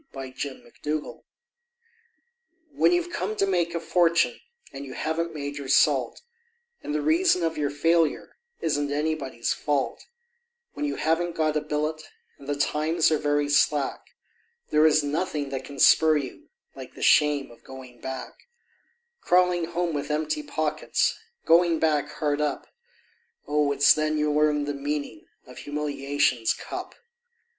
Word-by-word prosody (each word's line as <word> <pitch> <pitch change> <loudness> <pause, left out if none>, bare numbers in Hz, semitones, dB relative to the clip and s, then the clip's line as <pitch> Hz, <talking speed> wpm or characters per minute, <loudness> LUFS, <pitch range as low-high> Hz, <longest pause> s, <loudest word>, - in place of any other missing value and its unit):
The 135 -1 -7
Shame 135 0 -6
of 120 - -22
Going 150 0 -1
Back - - -31 1.5
When - - +3
you've 350 0 0
come 215 -9 -3
to 200 -2 +1
make 175 -3 0
a - - 0
fortune 170 -8 +2 0.3
and 135 +1 -7
you 135 -2 -8
haven't 165 +1 -2
made 145 -1 -5
your 140 - -7
salt, 135 - +2 0.6
And 150 - -4
the 150 - -1
reason 170 +3 +3
of 165 -1 0
your 145 -1 -1
failure 165 +2 +1 0.3
isn't 145 -3 -1
anybody's 145 -5 -2
fault 145 -3 -2 0.7
When 295 - -3
you - - -3
haven't 165 +2 0
got 155 -1 0
a 150 - +1
billet, 150 +1 -2 0.4
and 140 - -13
the 145 - 0
times 155 +3 +1
are 155 - +2
very 145 0 +1
slack, 145 -1 0 0.6
There 155 +1 +5
is 155 -1 +3
nothing 145 -1 -2
that 135 -1 -5
can 140 - -10
spur 155 +2 +5
you 150 - -7 0.3
like - - -10
the - - -7
shame 150 -5 +3
of 120 - -18
going 130 -2 -12
back; 130 -1 -6 0.9
Crawling 180 - +3
home 170 0 -2
with 145 0 -3
empty 150 0 -1
pockets, 155 +1 -1 0.3
Going 170 0 +4
back 150 -2 +1
hard 150 -1 -1
up; 145 -2 -2 0.8
Oh! 150 -1 +1
it's 140 0 +6
then 155 0 -1
you 150 0 +1
learn 150 -1 +2
the 145 - -3
meaning 145 +2 -4 0.2
of 125 - -12
humiliation's 145 -4 0
cup. - - -7
150 Hz, 155 wpm, -25 LUFS, 145-160 Hz, 1.5 s, it's